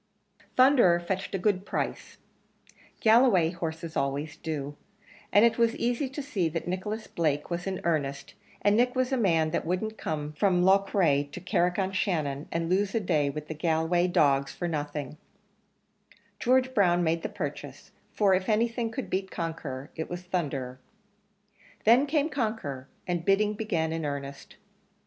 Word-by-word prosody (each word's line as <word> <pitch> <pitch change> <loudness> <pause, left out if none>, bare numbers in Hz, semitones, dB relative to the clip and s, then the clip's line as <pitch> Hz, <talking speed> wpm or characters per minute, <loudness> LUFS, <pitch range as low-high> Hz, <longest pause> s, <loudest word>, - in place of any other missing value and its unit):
Thunderer 255 -10 +5
fetched 190 +3 -3
a - - +1
good 190 0 +1
price; - - -4 0.9
Galway 220 -8 +5
horses 165 -2 -5
always 140 +3 -2
do; 145 -3 -5 0.6
and 205 +3 +6
it 235 - +2
was 230 0 +3
easy 245 +3 -1
to 275 +2 -6
see 200 - -1
that 165 +2 -4
Nicholas 210 +5 -3
Blake 150 -1 -1
was 175 +2 -3
in 190 -1 -2
earnest, 140 -4 -2 0.3
and 205 0 +4
Nick 245 +3 +2
was 255 0 0
a - - +2
man 165 -8 +2
that - - -1
wouldn't 200 +6 -2
come 150 -1 -3
from 180 +2 +2
Loughrea 190 -6 +3
to 145 +5 -9
Carrick 180 0 0
on 190 -1 0
Shannon, 155 -7 -1
and 165 0 -1
lose 195 +3 +1
a - - +3
day 155 -8 +1
with 150 +1 -6
the - - -4
Galway 160 +3 +1
dogs 140 -5 +2
for 175 - -4
nothing; 150 -2 -4 1.2
George 260 +1 +2
Brown 175 -5 +3
made 165 0 +1
the - - -3
purchase, - - -6 0.2
for 200 -3 +3
if 185 +2 0
anything 230 +2 +1
could 250 +3 -5
beat 190 0 -2
Conqueror 160 -6 -5
it 160 - -4
was 175 0 -5
Thunderer. 140 -8 -3 1.1
Then 245 +6 +6
came 295 0 +1
Conqueror, 215 - -3 0.2
and 175 -2 -2
bidding 205 +3 +2
began 165 -7 -1
in 165 0 -3
earnest. 140 -1 -6
175 Hz, 160 wpm, -28 LUFS, 155-210 Hz, 1.2 s, and